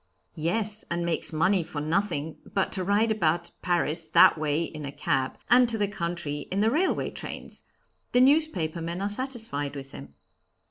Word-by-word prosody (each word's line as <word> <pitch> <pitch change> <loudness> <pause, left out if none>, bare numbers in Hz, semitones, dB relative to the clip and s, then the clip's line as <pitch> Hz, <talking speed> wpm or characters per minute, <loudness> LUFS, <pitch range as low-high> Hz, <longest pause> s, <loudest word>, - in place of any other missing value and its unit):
"Yes, 210 +7 -1
and 170 0 -1
makes 170 0 +1
money 175 +4 +2
for 155 -2 -6
nothing 160 -1 -1 0.2
but 195 - +1
to 185 - -1
ride 205 +4 +2
about 170 -4 0
Paris 165 -2 0
that - - +7
way 155 +1 0
in 155 -2 -7
a 140 - -5
cab, 130 -2 -1
and 245 0 +5
to 225 - +1
the 205 -1 +1
country 170 -7 -4
in 190 - -1
the 220 +2 +3
railway 345 +8 0
trains. - - -7 0.5
The 245 - +4
newspaper 255 - +2
men 170 +2 -4
are 200 +1 -1
satisfied 220 - -2
with 135 -1 -8
him." 70 +1 -11
175 Hz, 175 wpm, -27 LUFS, 155-210 Hz, 0.5 s, that